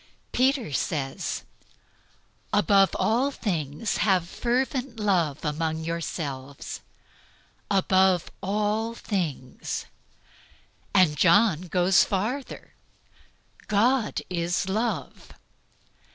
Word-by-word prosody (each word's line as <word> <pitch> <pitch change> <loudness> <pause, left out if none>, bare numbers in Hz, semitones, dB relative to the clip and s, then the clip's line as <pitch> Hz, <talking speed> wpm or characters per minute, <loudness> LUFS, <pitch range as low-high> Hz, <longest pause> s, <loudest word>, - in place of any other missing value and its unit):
Peter 260 - +1
says, 135 -2 -2 1.1
"Above 200 -2 +4
all 240 +6 +2
things 170 - -2
have 185 -5 +2
fervent 250 +2 -1
love 175 -9 +1
among 160 +1 -1
yourselves." 145 -5 -5 0.9
Above 190 -2 +3
all 210 +3 -1
things. 160 - -3 1.1
And 185 -6 +4
John 180 +1 +4
goes 180 +2 +4
farther, 230 +8 -3 0.9
"God 225 +3 +2
is 175 +1 -1
love." 220 +5 -3
190 Hz, 75 wpm, -26 LUFS, 165-220 Hz, 1.1 s, Above